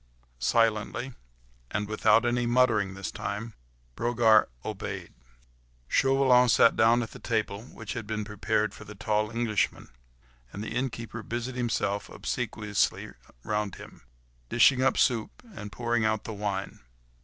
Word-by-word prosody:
Silently, 115 - +1 0.6
and 105 0 -2
without 110 +2 +3
any 120 0 +1
muttering 115 -6 +2
this 95 - -5
time, 115 +3 -5 0.4
Brogard 115 -2 +4 0.2
obeyed. 95 -3 -5 0.7
Chauvelin 130 - +4
sat 115 -1 +5
down 115 +2 +4
at 110 - -8
the - - -11
table, 110 -3 -2
which 115 -4 -8
had 115 -3 -6
been 105 -1 -3
prepared 105 +1 -1
for - - -11
the 105 0 -11
tall 105 +1 0
Englishman, 115 -2 -1 0.6
and 100 - -6
the - - -5
innkeeper 120 -2 -3
busied 120 +3 -4
himself 115 -5 -1
obsequiously 105 -4 -2 0.3
round 105 -2 -2
him, - - -13 0.5
dishing 125 +2 +5
up 135 0 +3
the - - -1
soup 115 -3 0
and 105 - -8
pouring 120 0 0
out 110 -1 +1
the 110 - -6
wine. 100 -1 -4
110 Hz, 140 wpm, -28 LUFS, 105-120 Hz, 0.7 s, sat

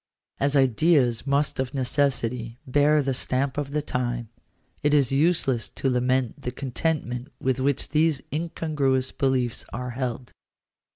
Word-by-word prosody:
As 140 +1 +1
ideas 135 -1 +3
most 140 0 +1
of 130 +1 -2
necessity 125 -3 0
bear 145 +3 +3
the 135 0 0
stamp 130 +1 0
of 145 -1 -2
the 150 +1 -1
time, 120 -4 -2 0.5
it 150 0 +3
is 140 -4 +3
useless 135 -5 +2
to 135 - -1
lament 125 -1 0
the - - -3
contentment 130 0 -2
with 130 0 0
which 140 +1 0
these 155 -1 +2
incongruous 150 -5 0
beliefs 130 -3 0
are 125 -1 -4
held. 125 -1 -4
130 Hz, 135 wpm, -25 LUFS, 125-145 Hz, 0.5 s, ideas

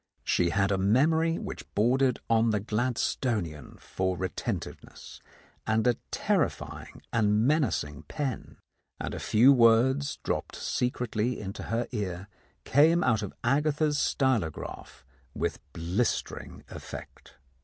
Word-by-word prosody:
She 85 - +2
had 100 +2 +1
a 95 - +1
memory 160 - +3
which - - -7
bordered 125 +4 +2
on 115 0 +3
the 105 -1 +1
Gladstonian 110 - -2
for 95 -1 -2
retentiveness, 95 0 -5 0.5
and 110 +1 +2
a 125 -1 +4
terrifying - - -2
and 105 -1 +3
menacing 105 - 0
pen, 135 - -4 0.4
and - - -4
a - - -4
few 120 +6 +5
words 130 +4 +4
dropped - - -2
secretly 125 -1 -1
into 100 -1 -6
her 115 +1 -2
ear 100 -5 -4 0.4
came 160 +5 +4
out 115 -4 +2
of 105 - -4
Agatha's 150 +3 +1
stylograph 125 - -1 0.3
with - - -2
blistering 90 +8 -2
effect. - - -10
115 Hz, 115 wpm, -28 LUFS, 100-130 Hz, 0.5 s, few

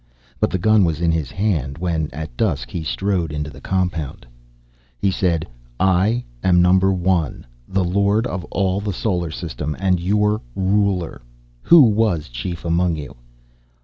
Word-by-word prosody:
But - - +2
the - - -1
gun 110 +3 +4
was 80 -3 0
in 85 -1 +2
his 80 -5 -1
hand 80 - -1
when, 80 -3 -1
at 75 -3 -7
dusk, - - -1
he 85 - -3
strode 90 -1 -1
into 75 0 -4
the - - -13
compound. 90 -9 -2 0.7
He 95 - +1
said, 85 -3 0 0.3
"I 95 +6 +2 0.2
am 90 -1 +4
Number 95 +2 +4
One, 90 -4 0 0.2
the 95 0 0
Lord 100 +5 +2
of 90 -6 -3
all 95 +3 -1
the 100 -1 -3
Solar 90 -4 -1
System, 75 -2 -5
and 95 -2 +2
your 105 +4 +1
ruler. 95 -4 0 0.4
Who 170 -3 +7
was 105 - +2
chief 80 +9 -5
among 85 0 +1
you?" 75 -3 -8
90 Hz, 155 wpm, -20 LUFS, 80-100 Hz, 0.7 s, Who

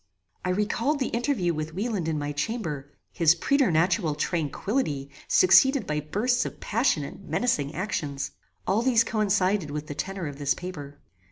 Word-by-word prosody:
I 180 - -1
recalled 230 +9 0
the 265 - -1
interview 235 -8 0
with 155 +1 -4
Wieland 200 -4 -2
in 160 -1 0
my 145 0 -2
chamber, 150 - -3 0.2
his 170 -1 +4
preternatural 175 - +2
tranquillity 150 - -2 0.2
succeeded 265 +9 +5
by 150 0 -1
bursts 230 - 0
of - - -7
passion 220 - +1
and 140 +7 -9
menacing 155 - 0
actions. 145 -7 -3 0.3
All 200 +4 +2
these 240 -2 +4
coincided 205 -5 +1
with 150 +1 -4
the 145 - -6
tenor 185 +5 -4
of 145 -1 -6
this 140 -1 +1
paper. 145 -6 -8
180 Hz, 155 wpm, -26 LUFS, 150-225 Hz, 0.3 s, succeeded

